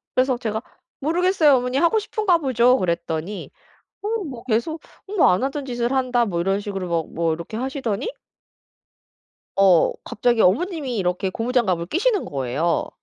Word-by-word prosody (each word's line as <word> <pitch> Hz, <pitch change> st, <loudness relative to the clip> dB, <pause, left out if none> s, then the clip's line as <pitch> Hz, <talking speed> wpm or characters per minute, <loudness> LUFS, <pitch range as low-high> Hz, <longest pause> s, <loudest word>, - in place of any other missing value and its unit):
그래서 255 Hz, 0 st, +2 dB
제가 220 Hz, -3 st, -3 dB, 0.4 s
"모르겠어요 330 Hz, -1 st, +3 dB
어머니. 250 Hz, +1 st, -1 dB
하고 340 Hz, +9 st, +3 dB
싶은가 425 Hz, -4 st, +1 dB
보죠." 255 Hz, -4 st, +3 dB
그랬더니 170 Hz, +1 st, -3 dB, 0.5 s
어 415 Hz, -, -3 dB
뭐 255 Hz, -8 st, -8 dB
계속 255 Hz, +7 st, -1 dB, 0.4 s
뭐 -, -, +6 dB
"안 180 Hz, +7 st, +1 dB
하던 275 Hz, +1 st, -2 dB
짓을 240 Hz, -2 st, -2 dB
한다." 250 Hz, -3 st, +2 dB
뭐 175 Hz, -5 st, -2 dB
이런 195 Hz, +3 st, +1 dB
식으로 195 Hz, -3 st, -4 dB
막 165 Hz, -2 st, -2 dB
뭐 165 Hz, -1 st, 0 dB
이렇게 170 Hz, +7 st, -6 dB
하시더니 260 Hz, -, -2 dB, 1.5 s
어 190 Hz, -4 st, +5 dB
갑자기 235 Hz, +1 st, +1 dB
어머님이 275 Hz, -, +1 dB
이렇게 185 Hz, 0 st, 0 dB
고무장갑을 220 Hz, -6 st, 0 dB
끼시는 405 Hz, -, +1 dB
거예요. 140 Hz, +5 st, -1 dB
240 Hz, 335 characters per minute, -22 LUFS, 185-275 Hz, 1.5 s, 뭐